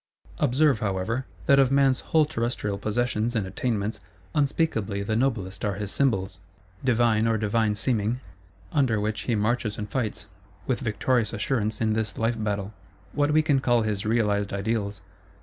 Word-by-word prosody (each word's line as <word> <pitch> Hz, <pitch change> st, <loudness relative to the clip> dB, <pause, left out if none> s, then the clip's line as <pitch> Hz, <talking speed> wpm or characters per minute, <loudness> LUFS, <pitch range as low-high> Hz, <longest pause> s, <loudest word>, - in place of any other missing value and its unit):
Observe, 140 Hz, -2 st, +3 dB
however, 105 Hz, +6 st, -2 dB, 0.2 s
that 140 Hz, 0 st, +5 dB
of 135 Hz, -1 st, +4 dB
man's 135 Hz, -1 st, +4 dB
whole 160 Hz, -1 st, +2 dB
terrestrial 115 Hz, -7 st, -2 dB
possessions 115 Hz, +2 st, -1 dB
and 105 Hz, -4 st, 0 dB
attainments, 105 Hz, +1 st, -2 dB, 0.3 s
unspeakably 135 Hz, -, 0 dB
the 110 Hz, +2 st, -1 dB
noblest 110 Hz, -7 st, -1 dB
are 100 Hz, -2 st, 0 dB
his 105 Hz, 0 st, -4 dB
Symbols, 100 Hz, -9 st, 0 dB, 0.4 s
divine 115 Hz, -3 st, +3 dB
or 115 Hz, -1 st, +2 dB
divine 110 Hz, 0 st, +1 dB
seeming; 115 Hz, +1 st, 0 dB, 0.5 s
under 130 Hz, -8 st, +2 dB
which 105 Hz, +1 st, -2 dB
he 115 Hz, -, +3 dB
marches 110 Hz, 0 st, 0 dB
and 105 Hz, -1 st, -5 dB
fights, 125 Hz, -6 st, -2 dB, 0.4 s
with 130 Hz, -, 0 dB
victorious 115 Hz, -1 st, 0 dB
assurance, 110 Hz, -1 st, -1 dB
in 110 Hz, -1 st, +1 dB
this 110 Hz, -4 st, -2 dB
life 115 Hz, 0 st, 0 dB
battle: 100 Hz, -1 st, -2 dB, 0.4 s
what 145 Hz, 0 st, +2 dB
we 155 Hz, +1 st, +4 dB
can 145 Hz, -4 st, +3 dB
call 120 Hz, -3 st, +2 dB
his 105 Hz, -2 st, -1 dB
Realised 105 Hz, -3 st, +1 dB
Ideals. 100 Hz, -1 st, -2 dB
110 Hz, 155 wpm, -26 LUFS, 105-125 Hz, 0.5 s, that